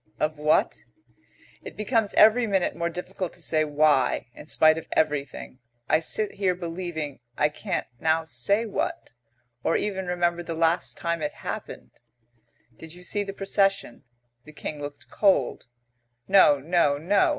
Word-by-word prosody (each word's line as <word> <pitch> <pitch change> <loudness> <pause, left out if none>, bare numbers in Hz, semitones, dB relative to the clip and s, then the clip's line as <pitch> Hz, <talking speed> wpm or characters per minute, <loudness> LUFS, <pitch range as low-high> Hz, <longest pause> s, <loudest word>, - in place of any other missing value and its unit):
Of 155 0 -1
what? 150 +1 +2 0.8
It - - -10
becomes 215 -1 +1
every 225 +2 +6
minute 195 -3 0
more 170 0 -1
difficult 180 +1 -5
to - - -12
say 155 -1 +1
why, 150 -4 +2
in 150 - -13
spite 155 0 +4
of - - -13
everything, 145 -4 -2 0.3
I 155 - +3
sit 210 +6 -1
here 190 -2 +1
believing 165 -5 -5 0.2
I 150 - +3
can't 185 +4 -3
now 160 0 +1
say 160 - +1
what, 215 - -3 0.5
or - - +2
even 190 -3 -3
remember 175 -1 0
the 165 -1 -5
last 165 +2 0
time 170 -1 -2
it 150 - -2
happened. - - -7 0.8
"Did 160 +1 -10
you 180 - -13
see 205 +3 -1
the 200 - -6
procession?" 195 - 0 0.4
"The 155 - -14
King 150 0 -6
looked 145 0 -8
cold." 195 - +1 0.6
"No, 190 -7 +6
no, 145 0 +1
no. 200 - +2
170 Hz, 150 wpm, -25 LUFS, 155-195 Hz, 0.8 s, every